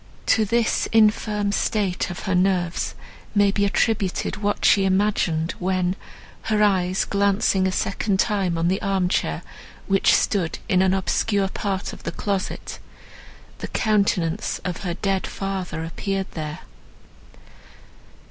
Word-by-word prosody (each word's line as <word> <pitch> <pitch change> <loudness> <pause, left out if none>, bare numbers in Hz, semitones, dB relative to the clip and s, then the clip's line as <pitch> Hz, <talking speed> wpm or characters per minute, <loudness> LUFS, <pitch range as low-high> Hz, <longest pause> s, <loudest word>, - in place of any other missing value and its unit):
To 220 - +3
this 230 +2 +1
infirm 210 -2 +2
state 200 -3 0
of 175 - -6
her 190 - -2
nerves 180 -2 +1 0.4
may 205 -1 +4
be 200 0 +1
attributed 200 -1 0
what 205 0 -1
she 195 - +5
imagined, 190 -4 +1
when, 185 0 0 0.5
her 215 -1 +2
eyes 185 -2 +2
glancing 200 -1 +2
a - - 0
second 195 +1 -1
time 195 -6 +1
on 165 +1 +1
the 190 +3 0
arm 190 -2 0
chair, 80 - -1 0.4
which 195 0 +4
stood 185 -6 0
in 185 -1 +3
an 190 0 +3
obscure 195 +1 0
part 195 -1 -3
of - - -11
the - - -4
closet, 200 -2 -3 0.8
the - - -5
countenance 200 -4 0
of 180 -2 -2
her 175 -3 -4
dead 195 0 -1
father 190 -4 -4
appeared 195 +4 -3
there. 155 -2 -5
195 Hz, 135 wpm, -23 LUFS, 180-205 Hz, 0.8 s, she